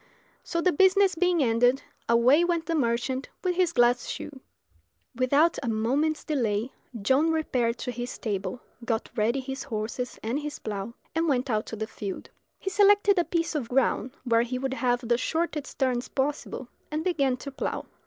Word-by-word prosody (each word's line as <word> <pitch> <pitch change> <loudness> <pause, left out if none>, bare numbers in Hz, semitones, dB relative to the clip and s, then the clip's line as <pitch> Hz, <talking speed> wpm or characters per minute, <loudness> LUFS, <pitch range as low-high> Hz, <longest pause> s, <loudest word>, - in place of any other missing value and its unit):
So, 335 - -2
the 365 - +3
business 380 +3 +4
being 355 -2 +2
ended, 245 +2 +3 0.3
away 245 +8 +5
went 340 -2 0
the 335 - -1
merchant 255 -1 0
with 365 -1 +1
his 355 -1 +2
glass 245 -3 +3
shoe. 280 -3 -6 0.8
Without 280 +7 +3
a 245 - -2
moment's 270 +8 0
delay 235 -5 -1 0.3
John 270 +9 +3
repaired 250 -7 0
to 250 - -4
his 245 +1 -5
stable, 210 +2 -4 0.2
got 225 -1 -2
ready 230 +5 +1
his 265 0 -5
horses 230 0 -4
and 235 +6 -1
his 295 0 -5
plough, 210 +2 -5 0.2
and 330 +1 +1
went 255 -2 +1
out 215 0 0
to - - -5
the 220 0 -3
field. 200 -3 -7 0.3
He 385 - -4
selected 405 -1 +5
a - - +4
piece 335 -1 -1
of 270 -7 -3
ground 260 +1 +1
where 230 -2 +3
he 245 +2 -2
would 265 +1 -2
have 245 -2 +1
the 240 0 +2
shortest 320 0 -2
turns 255 -2 0
possible, 270 -2 -3 0.2
and 310 +1 -2
began 280 -8 +1
to 280 +2 -7
plough. 270 - -3
265 Hz, 175 wpm, -27 LUFS, 235-320 Hz, 0.8 s, away